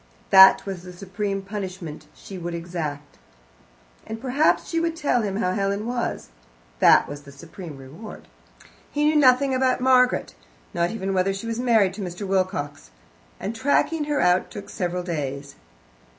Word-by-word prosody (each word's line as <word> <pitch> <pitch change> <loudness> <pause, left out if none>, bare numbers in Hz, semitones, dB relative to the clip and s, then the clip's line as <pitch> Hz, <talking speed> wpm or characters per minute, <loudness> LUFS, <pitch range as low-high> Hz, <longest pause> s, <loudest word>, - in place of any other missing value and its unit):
That 190 0 +8
was 190 -3 -5
the 180 0 -11
supreme 195 +2 -4
punishment 185 -6 -7
she 190 -2 -10
would 170 0 -4
exact. 160 -4 -6 0.9
And 220 +1 -6
perhaps 270 +5 +1
she 330 - -1
would 330 0 -1
tell 285 -6 +1
him 200 -3 -2
how 185 -3 0
Helen 200 +2 -1
was. 240 - -3 0.5
That - - +6
was 145 0 -8
the 140 -1 -14
supreme 160 +2 -10
reward. 145 +12 -11 0.6
He 295 +1 0
knew 305 +1 +3
nothing 270 -1 +4
about 255 0 +2
Margaret, 250 - +3 0.4
not 170 0 +1
even 195 -2 -3
whether 190 +1 +1
she 195 - -7
was 230 0 -3
married 225 -6 +3
to 205 - -7
Mr. 180 +1 -5
Wilcox, 185 - -2 0.5
and 215 +4 -4
tracking 285 +5 +1
her 295 -1 -1
out 180 +1 +2
took 205 - -9
several 180 -1 -2
days. 145 -5 -4
195 Hz, 160 wpm, -24 LUFS, 175-240 Hz, 0.9 s, That